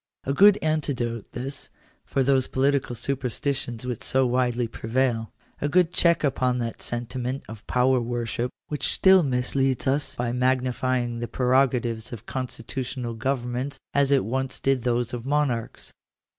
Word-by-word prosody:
A 135 Hz, -, -1 dB
good 205 Hz, +6 st, +7 dB
antidote, 130 Hz, -8 st, -1 dB
this, 135 Hz, +3 st, -5 dB, 0.4 s
for 135 Hz, -, +1 dB
those 135 Hz, -1 st, +3 dB
political 135 Hz, -2 st, +1 dB
superstitions 125 Hz, 0 st, -2 dB
which 125 Hz, -3 st, -4 dB
so 130 Hz, 0 st, +2 dB
widely 125 Hz, -1 st, +1 dB
prevail. 115 Hz, 0 st, -1 dB, 0.3 s
A 145 Hz, -, 0 dB
good 175 Hz, +1 st, +3 dB
check 170 Hz, -2 st, +3 dB
upon 130 Hz, -3 st, +1 dB
that 115 Hz, -2 st, -4 dB
sentiment 125 Hz, +2 st, -3 dB
of 110 Hz, -1 st, -11 dB
power 125 Hz, 0 st, +3 dB
worship 120 Hz, 0 st, -2 dB, 0.2 s
which 150 Hz, -3 st, -1 dB
still 190 Hz, -1 st, +6 dB
misleads 130 Hz, -1 st, 0 dB
us 140 Hz, +2 st, 0 dB
by 120 Hz, -1 st, -1 dB
magnify 130 Hz, 0 st, +1 dB
ing 120 Hz, -1 st, -4 dB
the 120 Hz, -, -3 dB
prerogatives 125 Hz, -3 st, +1 dB
of 120 Hz, -1 st, -8 dB
constitutional 125 Hz, -1 st, -4 dB
governments 125 Hz, +3 st, -2 dB, 0.2 s
as 140 Hz, -1 st, +3 dB
it 140 Hz, -7 st, +3 dB
once 130 Hz, +3 st, -2 dB
did 135 Hz, -2 st, +1 dB
those 120 Hz, 0 st, 0 dB
of 120 Hz, -1 st, -4 dB
monarohs. 140 Hz, -5 st, -1 dB
125 Hz, 145 wpm, -25 LUFS, 120-135 Hz, 0.4 s, good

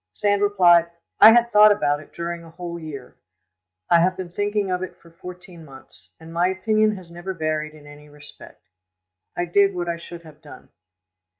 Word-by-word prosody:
Sand 205 Hz, -1 st, 0 dB
replied, 175 Hz, -4 st, +4 dB, 0.3 s
"I 220 Hz, -, +10 dB
had 235 Hz, +1 st, +3 dB
thought 210 Hz, 0 st, +7 dB
about 145 Hz, -8 st, 0 dB
it 155 Hz, -, -16 dB
during 170 Hz, 0 st, -6 dB
a 165 Hz, -, -14 dB
whole 170 Hz, 0 st, -8 dB
year. 145 Hz, -5 st, -10 dB, 0.7 s
I 170 Hz, -, +4 dB
have 185 Hz, +2 st, +1 dB
been 185 Hz, -2 st, -6 dB
thinking 205 Hz, +1 st, -2 dB
of 180 Hz, 0 st, -2 dB
it 185 Hz, -, -7 dB
for 170 Hz, -, -20 dB
fourteen 180 Hz, 0 st, -12 dB
months, 130 Hz, -9 st, -17 dB
and 165 Hz, +1 st, -13 dB
my 175 Hz, +2 st, +1 dB
opinion 215 Hz, +3 st, 0 dB
has 180 Hz, -3 st, -13 dB
never 175 Hz, +2 st, -7 dB
varied 155 Hz, -1 st, -3 dB
in 150 Hz, -1 st, -16 dB
any 145 Hz, 0 st, -15 dB
respect: 145 Hz, -8 st, -15 dB, 0.7 s
I 175 Hz, -, -1 dB
did 195 Hz, +2 st, +2 dB
what 175 Hz, -1 st, -4 dB
I 170 Hz, 0 st, -3 dB
should 170 Hz, 0 st, -11 dB
have 155 Hz, -1 st, -16 dB
done." 150 Hz, -, -15 dB
175 Hz, 190 wpm, -22 LUFS, 160-190 Hz, 0.7 s, I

